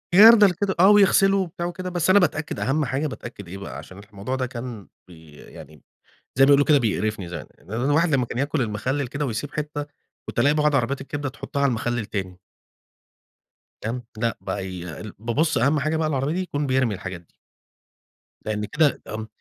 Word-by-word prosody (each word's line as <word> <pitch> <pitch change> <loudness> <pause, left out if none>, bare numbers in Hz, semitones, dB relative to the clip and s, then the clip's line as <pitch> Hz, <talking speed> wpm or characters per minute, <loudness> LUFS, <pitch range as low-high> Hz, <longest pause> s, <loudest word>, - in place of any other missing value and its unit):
جردل 210 0 +9
كده 190 +2 -1
آه، 190 +3 +7
ويغسله 195 -1 +5
وبتاع 175 -2 -3
وكده 185 +1 -4
بس 175 -1 0
أنا 195 +2 +7
باتأكّد 155 -4 -1
أهم 145 +3 0
حاجة 135 +4 -1
باتأكّد 120 -7 -9
إيه 95 +3 -7
بقى 100 - -7
عشان 95 - -11
الح 100 - -15
الموضوع 105 +6 -4
ده 130 - -1
كان 120 -4 -7 0.2
بي 80 -3 -15
يعني 75 +1 -13 0.5
زي 135 - +6
بيقولوا 140 0 +5
كده 150 -2 +5
بيقرفني 105 -5 -1
زي 85 -4 -5
إن 90 - -18
الواحد 145 +8 +2
لمّا 135 -5 +2
كان 120 - -6
ياكل 145 +2 0
المخلل 125 +5 -2
كده 145 +3 -3
ويسيب 135 +4 -4
حتّة، 150 -1 -4 0.4
كنت - - -3
ألاقي 140 +5 +4
بعض 150 -1 +2
عربيات 135 +1 0
الكبده 145 +1 -4
تحطها 140 +2 -5
على 140 - +4
المخلل 120 0 -1
التاني. 95 -4 -5 1.4
تمام؟ 120 +3 -4
لأ 115 0 -1
بقى 95 -1 -4
ي 90 -2 -7 0.4
بابُص 135 +9 0
أهم 140 +6 +2
حاجة 155 +3 0
بقى 160 -1 0
العربية 140 0 -1
دي 185 - -1
يكون 145 -5 -3
بيرمي 130 -4 +1
الحاجات 95 -2 -7
دي. 85 - -33 1.1
لأن 105 -1 -2
كده 150 +5 +1
ام 110 0 -5
135 Hz, 190 wpm, -23 LUFS, 110-155 Hz, 1.4 s, جردل